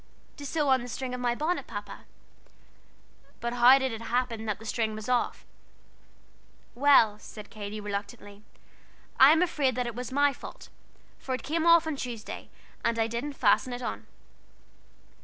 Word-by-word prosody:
"To 285 Hz, -2 st, -7 dB
sew 300 Hz, -1 st, 0 dB
on 260 Hz, -1 st, +4 dB
the 245 Hz, -, -7 dB
string 250 Hz, +1 st, -5 dB
of 250 Hz, -, -4 dB
my 240 Hz, -1 st, +1 dB
bonnet, 320 Hz, +7 st, -2 dB
Papa." -, -, -8 dB, 1.3 s
"But 235 Hz, 0 st, -3 dB
how 245 Hz, +2 st, +7 dB
did 265 Hz, -1 st, -1 dB
it 225 Hz, 0 st, -6 dB
happen 230 Hz, -1 st, -2 dB
that 210 Hz, -, -1 dB
the 225 Hz, -, -13 dB
string 220 Hz, 0 st, -1 dB
was 215 Hz, 0 st, -7 dB
off?" 250 Hz, -1 st, 0 dB, 1.3 s
"Well," 240 Hz, -6 st, +5 dB
said 210 Hz, -1 st, -11 dB
Katy, 210 Hz, 0 st, -6 dB
reluctantly, 205 Hz, 0 st, -6 dB, 0.8 s
"I 265 Hz, +2 st, +9 dB
am 325 Hz, +3 st, +4 dB
afraid 285 Hz, -8 st, 0 dB
that 245 Hz, -2 st, -2 dB
was 245 Hz, +1 st, -6 dB
my 285 Hz, +1 st, +3 dB
fault, -, -, -11 dB, 0.5 s
for 260 Hz, -, -3 dB
it -, -, -8 dB
came 325 Hz, +4 st, -1 dB
off 335 Hz, -1 st, +6 dB
on 315 Hz, -3 st, -3 dB
Tuesday, 235 Hz, -4 st, -6 dB, 0.3 s
and 230 Hz, 0 st, +1 dB
I 225 Hz, -, +2 dB
didn't 235 Hz, +6 st, -4 dB
fasten 250 Hz, +1 st, +2 dB
it 245 Hz, +1 st, -6 dB
on." -, -, -5 dB
245 Hz, 165 wpm, -28 LUFS, 225-275 Hz, 1.3 s, I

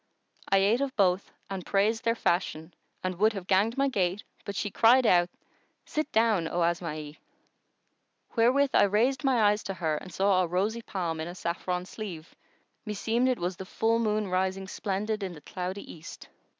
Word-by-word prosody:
I 195 Hz, -, +5 dB
ate 205 Hz, +6 st, +3 dB
of 275 Hz, -2 st, -2 dB
both 190 Hz, -1 st, +2 dB, 0.2 s
and 190 Hz, -2 st, -5 dB
praised 215 Hz, +5 st, +1 dB
their 230 Hz, 0 st, +2 dB
fashion 170 Hz, -5 st, -1 dB, 0.3 s
and 185 Hz, -1 st, -3 dB
would 215 Hz, +2 st, +4 dB
have 195 Hz, -3 st, -6 dB
ganged 205 Hz, +6 st, +2 dB
my 275 Hz, 0 st, +3 dB
gait; 195 Hz, -5 st, 0 dB, 0.2 s
but 200 Hz, -, -5 dB
she 205 Hz, +1 st, -2 dB
cried 245 Hz, +5 st, +5 dB
out, 175 Hz, -3 st, +4 dB, 0.6 s
'Sit 310 Hz, 0 st, -3 dB
down, 220 Hz, -7 st, +2 dB
O 175 Hz, +1 st, 0 dB
Asma'i!' 155 Hz, -3 st, -3 dB, 1.2 s
Wherewith 260 Hz, +4 st, +4 dB
I -, -, +6 dB
raised 235 Hz, +8 st, +1 dB
my 255 Hz, -5 st, +3 dB
eyes 210 Hz, +1 st, -1 dB
to 195 Hz, -, -3 dB
her 160 Hz, -4 st, -1 dB
and 185 Hz, -, -9 dB
saw 190 Hz, +1 st, +3 dB
a 180 Hz, -, 0 dB
rosy 200 Hz, +7 st, -1 dB
palm 175 Hz, -7 st, -3 dB
in 160 Hz, -, -3 dB
a 175 Hz, -, -7 dB
saffron 180 Hz, +1 st, -3 dB
sleeve, 185 Hz, -6 st, -8 dB, 0.5 s
meseemed 230 Hz, +4 st, 0 dB
it 255 Hz, -, +1 dB
was 175 Hz, +1 st, -3 dB
the 190 Hz, -, -7 dB
full 225 Hz, +3 st, +1 dB
moon 215 Hz, -2 st, 0 dB
rising 190 Hz, +1 st, -1 dB
splendid 210 Hz, +2 st, -2 dB
in 190 Hz, -2 st, -4 dB
the 150 Hz, -, -12 dB
cloudy 185 Hz, +4 st, -5 dB
East. 160 Hz, -2 st, -11 dB
195 Hz, 180 wpm, -28 LUFS, 180-225 Hz, 1.2 s, I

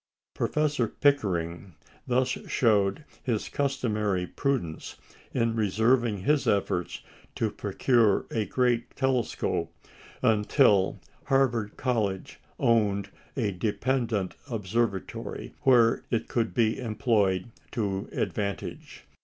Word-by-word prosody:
Professor 150 Hz, -6 st, 0 dB
Pickering 95 Hz, -, 0 dB, 0.3 s
thus 125 Hz, +1 st, +2 dB, 0.2 s
showed 105 Hz, +1 st, +2 dB, 0.2 s
his 115 Hz, -5 st, -1 dB
customary 110 Hz, -9 st, 0 dB
prudence 120 Hz, -, -2 dB, 0.4 s
in 115 Hz, -2 st, 0 dB
reserving 110 Hz, 0 st, +2 dB
his 150 Hz, +4 st, +2 dB
efforts 95 Hz, -3 st, 0 dB, 0.3 s
to -, -, 0 dB
procure 115 Hz, -6 st, +2 dB
a 110 Hz, -2 st, 0 dB
great 120 Hz, -2 st, 0 dB
telescope 130 Hz, -3 st, 0 dB, 0.5 s
until 105 Hz, -2 st, +3 dB, 0.3 s
Harvard 125 Hz, -6 st, +1 dB
College 110 Hz, -7 st, -1 dB, 0.2 s
owned 100 Hz, -4 st, +2 dB, 0.3 s
a 110 Hz, -6 st, +1 dB
dependent 110 Hz, +1 st, -1 dB, 0.2 s
observatory 110 Hz, -2 st, -2 dB
where 120 Hz, -3 st, +4 dB
it 115 Hz, -, -1 dB
could 115 Hz, -2 st, -1 dB
be 115 Hz, -3 st, +2 dB
employed 110 Hz, -4 st, +1 dB, 0.2 s
to 100 Hz, -4 st, -2 dB
advantage. 100 Hz, -3 st, -4 dB
115 Hz, 95 wpm, -27 LUFS, 100-125 Hz, 0.5 s, where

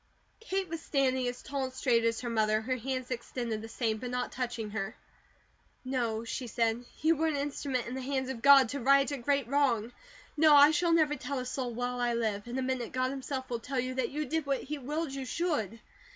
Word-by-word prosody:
Kate 390 Hz, -4 st, -2 dB
was 330 Hz, -1 st, -5 dB
standing 260 Hz, -4 st, +1 dB
as 245 Hz, 0 st, -5 dB
tall 275 Hz, -1 st, -2 dB
and 260 Hz, -, -7 dB
straight 240 Hz, -3 st, +2 dB
as 230 Hz, 0 st, +1 dB
her 240 Hz, -, -3 dB
mother, 215 Hz, -1 st, +2 dB
her 255 Hz, +3 st, -1 dB
hands 255 Hz, +1 st, -4 dB
extended 235 Hz, -2 st, -3 dB
the 225 Hz, -, -7 dB
same, 225 Hz, -1 st, -1 dB
but 250 Hz, +1 st, -5 dB
not 250 Hz, 0 st, -2 dB
touching 240 Hz, -4 st, -3 dB
her. 215 Hz, 0 st, -3 dB, 0.9 s
"No," 235 Hz, -4 st, -1 dB
she 240 Hz, +2 st, -4 dB
said. 230 Hz, +1 st, 0 dB, 0.2 s
"You 325 Hz, +1 st, +5 dB
were 320 Hz, +2 st, +1 dB
an 310 Hz, -, 0 dB
instrument 280 Hz, -3 st, -2 dB
in 235 Hz, -, -5 dB
the 260 Hz, -, -4 dB
hands 265 Hz, 0 st, -2 dB
of 250 Hz, -4 st, -5 dB
God 275 Hz, -1 st, +8 dB
to 280 Hz, -, -3 dB
right 275 Hz, +3 st, +4 dB
a 285 Hz, -, -2 dB
great 275 Hz, 0 st, 0 dB
wrong. 245 Hz, -5 st, +1 dB, 0.4 s
No! 305 Hz, -1 st, +6 dB
I 290 Hz, +1 st, +8 dB
shall 335 Hz, +2 st, +2 dB
never 310 Hz, -3 st, +3 dB
tell 280 Hz, +1 st, -4 dB
a 255 Hz, -, -3 dB
soul 250 Hz, -1 st, -3 dB
while 245 Hz, +1 st, -2 dB
I 240 Hz, -1 st, +1 dB
live. 215 Hz, -2 st, -1 dB
In 240 Hz, +2 st, -4 dB
a 265 Hz, -, 0 dB
minute 255 Hz, -2 st, -2 dB
God 255 Hz, 0 st, 0 dB
himself 265 Hz, -1 st, -4 dB
will 235 Hz, -, -1 dB
tell 260 Hz, +3 st, -3 dB
you 255 Hz, +1 st, -2 dB
that 255 Hz, -2 st, -1 dB
you 300 Hz, +2 st, -3 dB
did 315 Hz, +1 st, -2 dB
what 275 Hz, -1 st, 0 dB
He 295 Hz, +1 st, -5 dB
willed 295 Hz, +2 st, -3 dB
you 275 Hz, -1 st, -4 dB
should." 250 Hz, -, -2 dB
255 Hz, 230 wpm, -30 LUFS, 235-280 Hz, 0.9 s, God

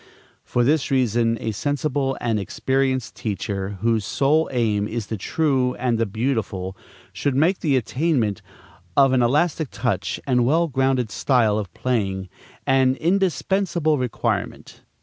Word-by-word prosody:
For 120 Hz, -, 0 dB
this 145 Hz, +3 st, +2 dB
reason, 120 Hz, -3 st, +2 dB
a 110 Hz, -, -2 dB
sensible 140 Hz, +3 st, -1 dB
and 115 Hz, -3 st, 0 dB
experienced 130 Hz, +4 st, -1 dB
teacher, 100 Hz, -2 st, -3 dB
whose 115 Hz, -2 st, +1 dB
sole 140 Hz, -, +1 dB
aim 110 Hz, -5 st, +1 dB
is 115 Hz, -1 st, -4 dB
the 110 Hz, -, -4 dB
true 130 Hz, -, 0 dB
and 120 Hz, -2 st, 0 dB
the 115 Hz, -, +1 dB
beautiful, 100 Hz, -4 st, -2 dB, 0.4 s
should 140 Hz, -2 st, -1 dB
make 165 Hz, +7 st, +2 dB
the 145 Hz, -5 st, +2 dB
attainment 125 Hz, -, 0 dB, 0.6 s
of 135 Hz, -1 st, +5 dB
an 130 Hz, -, +3 dB
elastic 150 Hz, +4 st, +1 dB
touch 100 Hz, -6 st, -2 dB
and 125 Hz, -3 st, +2 dB
well 160 Hz, +7 st, +2 dB
grounded 130 Hz, -4 st, 0 dB
style 110 Hz, -5 st, +2 dB
of 100 Hz, -4 st, -5 dB
playing 95 Hz, -7 st, -1 dB, 0.4 s
an 130 Hz, -1 st, +3 dB
indispensable 175 Hz, -2 st, +1 dB
requirement. 125 Hz, -3 st, -3 dB
125 Hz, 135 wpm, -22 LUFS, 110-140 Hz, 0.6 s, of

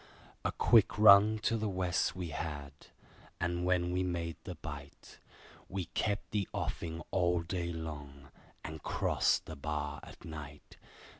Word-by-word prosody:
A -, -, +1 dB
quick 115 Hz, -4 st, +4 dB
run 105 Hz, +1 st, +8 dB
to 115 Hz, -, +2 dB
the 110 Hz, -1 st, -1 dB
West 90 Hz, -2 st, 0 dB
we 90 Hz, -2 st, -4 dB
had, 75 Hz, -2 st, -4 dB, 0.7 s
and 85 Hz, 0 st, -1 dB
when 90 Hz, -1 st, +2 dB
we 90 Hz, +1 st, +1 dB
made 85 Hz, -2 st, -2 dB
the 90 Hz, -, -5 dB
Bight, 75 Hz, -3 st, -9 dB, 0.5 s
We 95 Hz, -2 st, -3 dB
kept 105 Hz, 0 st, -1 dB
the 100 Hz, -3 st, -1 dB
offing 85 Hz, 0 st, -3 dB
all 90 Hz, -2 st, +2 dB
day 85 Hz, 0 st, -2 dB
long, 70 Hz, -4 st, -7 dB, 0.3 s
and 80 Hz, 0 st, -6 dB
crossed -, -, +1 dB
the 80 Hz, -, -7 dB
bar 75 Hz, 0 st, -3 dB
at -, -, -13 dB
night. 75 Hz, -2 st, -9 dB
85 Hz, 145 wpm, -33 LUFS, 75-90 Hz, 0.7 s, run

